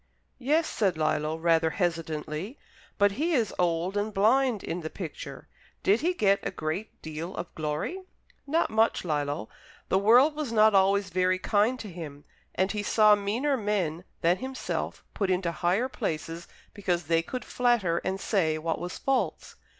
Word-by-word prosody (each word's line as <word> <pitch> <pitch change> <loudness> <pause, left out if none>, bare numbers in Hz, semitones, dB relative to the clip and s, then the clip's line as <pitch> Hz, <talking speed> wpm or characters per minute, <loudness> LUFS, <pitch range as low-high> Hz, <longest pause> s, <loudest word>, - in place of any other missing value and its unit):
"Yes," 300 +6 +2
said 190 -6 0
Lillo, 155 0 0
rather 165 0 +3
hesitatingly. 165 - -3 0.4
"But 205 0 +4
he 315 - -1
is 230 -8 +1
old 175 +2 +1
and 205 +1 -1
blind 225 +2 +2
in 175 +2 -3
the 160 - -5
picture. 165 -5 -8 0.4
Did 205 +4 +3
he 355 +3 +1
get 200 - +3
a - - -2
great 160 +7 -4
deal 160 +4 -6
of 175 - -6
glory?" 155 - -3 0.5
"Not 325 +4 +1
much, 220 -3 +2
Lillo. 145 -8 -1 0.4
The 190 - +3
world 245 +9 +6
was 300 -6 -3
not 215 -1 +5
always 195 0 +3
very 185 +1 +2
kind 215 +6 +1
to 215 - -7
him, 155 -6 -8 0.3
and 190 +2 +1
he 210 - -2
saw 210 0 +5
meaner 220 +8 +1
men 195 -8 -1 0.2
than 170 +2 +3
himself 260 +2 -4
put 195 -2 -1
into 180 -2 +1
higher 180 +9 +1
places 165 -8 -4 0.3
because 180 -4 -1
they 165 +1 +2
could 250 +9 -6
flatter 235 -9 +1
and 190 +1 -3
say 165 -8 +1
what 165 +1 -2
was 180 +1 -5
false. 250 -11 -1
195 Hz, 165 wpm, -28 LUFS, 165-220 Hz, 0.5 s, world